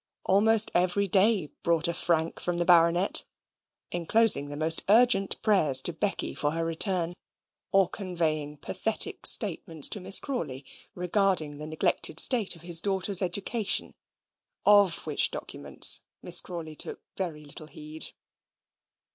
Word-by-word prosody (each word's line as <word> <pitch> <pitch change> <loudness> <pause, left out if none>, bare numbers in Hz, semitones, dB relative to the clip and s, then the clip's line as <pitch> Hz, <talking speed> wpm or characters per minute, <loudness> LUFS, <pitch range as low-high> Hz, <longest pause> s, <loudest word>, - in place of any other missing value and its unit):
Almost 220 +3 +3
every 180 +3 0
day 195 -3 +1
brought 170 0 +1
a 170 - -2
frank 165 -1 -2
from 175 -1 -4
the 175 - -2
Baronet, 175 +2 +4 0.7
enclosing 175 -3 +2
the 145 - -8
most 160 +1 0
urgent 210 -3 +3
prayers 160 - +4
to 175 - +1
Becky 195 +5 -4
for 145 0 -2
her 165 0 -2
return, 170 +1 +1 0.6
or 195 -2 +3
conveying 160 -7 -5
pathetic 220 - -1
statements 160 -6 +1
to 210 - -5
Miss 195 +1 +4
Crawley, 145 - -6 0.3
regarding 180 -5 -1
the 150 - -8
neglected 155 0 -1
state 230 -8 +1
of 165 - -17
his 170 -1 +5
daughters' 195 0 +1
education; 200 +4 -2 0.7
of 205 -4 +3
which 155 -2 0
documents - - +2 0.2
Miss 175 0 +4
Crawley 165 -3 -9
took - - -7
very 160 -5 -6
little 150 +1 -12
heed. 155 +1 -7
175 Hz, 135 wpm, -26 LUFS, 160-195 Hz, 0.7 s, his